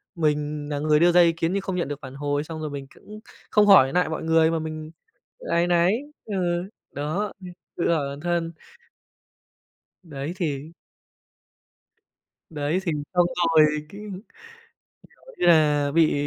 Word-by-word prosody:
mình 150 -2 -1
nà 145 -1 -2
người 150 0 +3
đưa 175 +1 +5
ra 175 0 +6
ý 170 -1 +5
kiến 165 +2 -2
nhưng 200 - 0
không 190 -1 -4
nhận 175 -6 -1
được 145 0 -5
phản 135 0 -9
hồi, 145 +1 -1
xong 160 0 -7
rồi 155 - -3
mình 140 -1 -7
cũng 210 +1 -12 0.3
không 210 -1 +5
hỏi 170 -10 +7
nại 180 -3 +2
mọi 160 - -4
người 160 0 +3
mà 165 - 0
mình 155 0 -6 0.6
áy 170 +1 +2
náy. 175 +1 +3 0.3
Ừ, 210 - -4 0.6
đó, 160 +9 -3
ừm, 180 -1 -9 0.3
tự 170 0 +1
hỏi 145 -4 0
bản 140 - -7
thân. 170 0 -1 1.5
Đấy, 145 0 -6
thì 155 -4 -3 1.8
Đấy, 150 +3 -1
thì 170 - -1 0.2
xong 175 -1 +4 0.3
rồi 155 -1 +7
cái, - - -2
kiểu 205 - -10 1.0
như - - +1
là, 150 -3 +4
bị, 160 +1 +3
160 Hz, 160 wpm, -24 LUFS, 150-175 Hz, 1.8 s, hỏi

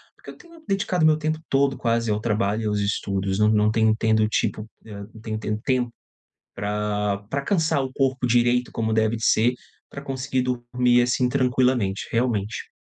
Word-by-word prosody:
porque - - -14
eu - - -16
tenho 335 -2 -17
dedicado 190 -4 +1
meu 155 -1 +5
tempo 155 0 -2
todo 135 -1 +2
quase 115 -2 0
ao 105 - 0
trabalho 105 -1 0
e - - -3
aos 105 -1 0
estudos. 100 -1 -1
Não 105 - +4
não 105 0 +3
tenho 110 -1 +3
tendo 110 -1 +2
tipo, 110 0 -2 0.2
eh, 105 -2 -9
não 110 - -13
tenho 110 -1 -4
tendo 105 0 -3
tempo 125 -3 0 0.6
pra 105 0 -1
pra 140 +2 -1
cansar 160 -4 +1
o 130 - -4
corpo 130 -2 0
direito 120 +1 +2
como 110 -1 -1
deve 110 +1 +1
de 110 - -4
ser, 120 +3 +3 0.3
pra 140 - -9
conseguir 130 -1 -2
dormir 125 0 +1
assim, 125 +1 +1
tranquilamente, 125 -6 +1
realmente. 115 -3 -1
120 Hz, 180 wpm, -23 LUFS, 105-130 Hz, 0.6 s, meu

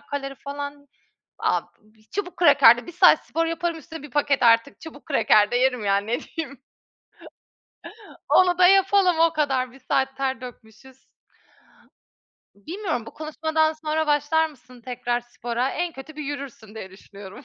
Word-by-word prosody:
kalori 275 -1 -4
falan. 285 0 -7 0.5
Ab - - 0 0.5
çubuk 395 -3 -5
kraker 285 -8 +6
de 240 - -9
1 - - -7
saat 350 - +5
spor 330 0 -1
yaparım, 330 0 -2
üstüne 320 -1 -10
bir 295 - -11
paket 285 -1 +1
artık 230 +3 +3
çubuk 310 -3 -12
kraker 215 -8 +3
de - - -1
yerim 250 -3 +1
yani, 200 +1 +1
ne 235 +2 -1
diyeyim. 280 -5 -8 1.7
Onu 360 -1 +4
da 360 - +7
yapalım 385 -1 +4
o 330 0 +4
kadar. 270 -5 -1
1 270 - -16
saat 265 +1 -1
ter 265 -2 -2
dökmüşüz. 250 +1 -13 1.5
Bilmiyorum, 315 - -5
bu - - -8
konuşmadan 315 +1 -1
sonra 315 0 -2
başlar 300 +2 +2
mısın 255 -4 -18
tekrar 245 -1 -3
spora? 240 +1 -3
En 345 0 -3
kötü 300 +2 -11
bir 305 - -5
yürürsün 275 -6 -8
diye 190 -4 -8
düşünüyorum. 195 +1 -13
280 Hz, 150 wpm, -23 LUFS, 245-320 Hz, 1.7 s, da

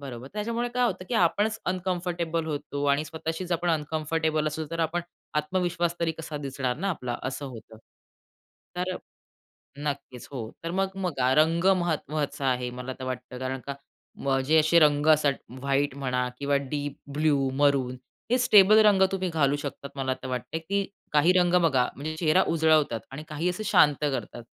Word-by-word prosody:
बरोबर. 130 -3 -8
त्याच्यामुळे 230 +3 -2
काय 250 0 +3
होतं 185 - -3
की 240 - -2
आपणच 215 +3 +2
अनकम्फर्टेबल 175 -3 -2
होतो 145 -2 -3
आणि 145 +2 +1
स्वतःशीच 160 +3 -4
आपण 170 +1 +1
अनकम्फर्टेबल 155 0 0
असलो 155 +1 -2
तर 165 - -2
आपण 165 +2 0 0.4
आत्मविश्वास 175 +1 0
तरी 165 -1 +1
कसा 155 -1 -6
दिसणार 135 -3 -3
ना 195 +7 -2
आपला? 125 -8 -3
असं 135 +2 -4
होतं. 115 -3 -11 1.0
तर 180 0 -2 0.8
नक्कीच, 140 -4 -5
हो. 120 -5 -5
तर 165 - -3
मग 195 +1 0
बघा 130 -7 +1
रंग 165 +2 +3
महत 175 -3 +1
महत्वाचा 150 -2 -2
आहे. 125 -1 0
मला 125 +1 -6
तर - - -6
वाटतं 125 0 -5
कारण 130 +1 -3
का 140 - -2 0.5
मग 135 -1 +2
जे 160 +2 +5
असे 160 +2 +5
रंग 145 -2 +4
असतात 150 -2 +2 0.3
,व्हाईट 140 +1 0
म्हणा 125 -2 -1
किंवा 140 0 +1
डीप 145 +1 -4 0.2
ब्लू, 145 -2 +2
मरून 135 -2 +2 0.4
हे 250 - +5
स्टेबल 215 -3 +7
रंग 200 -2 +5
तुम्ही 190 -1 -1
घालू 145 -4 +2
शकतात. 140 -1 -6
मला 130 -1 -1
तर - - -4
वाटतंय, 130 +5 -3
की 200 +4 -1 0.3
काही 150 +4 +5
रंग 175 0 +2
बघा 130 -6 +3
म्हणजे 155 +3 -5
चेहरा 165 +2 +4
उजळवतात 155 -7 +3
आणि 145 +3 -7
काही 155 +4 -1
असे 180 +4 -4
शांत 150 -8 +5
करतात. 130 -5 -3
155 Hz, 170 wpm, -27 LUFS, 135-170 Hz, 1.0 s, स्टेबल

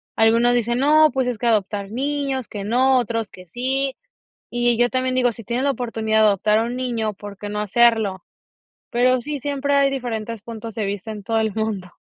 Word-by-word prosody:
algunos 230 +2 +4
dicen, 240 0 +1
no, 305 +3 +5
pues 260 -2 0
es 245 -3 -2
que 240 - -1
adoptar 205 -2 0
niños, 270 +1 -2
que 205 -2 -6
no, 255 +5 +3
otros, 230 -3 -2
que 185 0 -14
sí, 265 +7 -2 0.5
y 240 -1 +1
yo 245 0 +4
también 255 0 -1
digo, 250 -1 +2
si 230 - -10
tienen 240 +5 -2
la 280 - +3
oportunidad 225 -4 0
de 215 - +6
adoptar 210 +2 +2
a 225 - +2
un 240 +2 -3
niño, 235 -4 -2
¿por 205 0 -10
qué 205 +1 -6
no 210 0 -3
hacerlo? 210 -3 +2 0.7
Pero 250 +1 +3
sí, 290 +4 -5
siempre 285 +1 -1
hay 280 -1 +4
diferentes 230 -4 -4
puntos 225 0 -8
de 220 -3 -2
vista 200 +2 -4
en 210 -2 -8
todo 225 +2 0
el 220 -2 -1
mundo. 210 -4 -3
235 Hz, 210 wpm, -21 LUFS, 215-255 Hz, 0.7 s, de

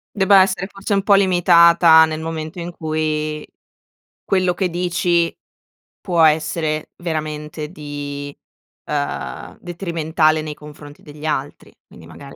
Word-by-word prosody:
Debba 195 -1 +5
essere 190 0 -2
forse 195 +1 -4
un 195 - +2
po' 200 +1 +4
limitata, 170 -3 +6
nel 155 0 -5
momento 160 +2 -6
in 170 0 -5
cui 155 -1 -3 0.8
quello 185 -2 +1
che 185 +1 -1
dici, 175 -1 0 0.7
può 175 -3 0
essere 155 0 +1
veramente 155 -2 -5
di 145 -3 -7 0.5
ehm, 145 -1 -4
detrimentale 160 -3 -1
nei 155 -1 -5
confronti 150 -1 -13
degli 150 +1 -11
altri, 145 -2 -4 0.2
quindi - - -15
magari, - - -13
160 Hz, 120 wpm, -19 LUFS, 150-175 Hz, 0.8 s, limitata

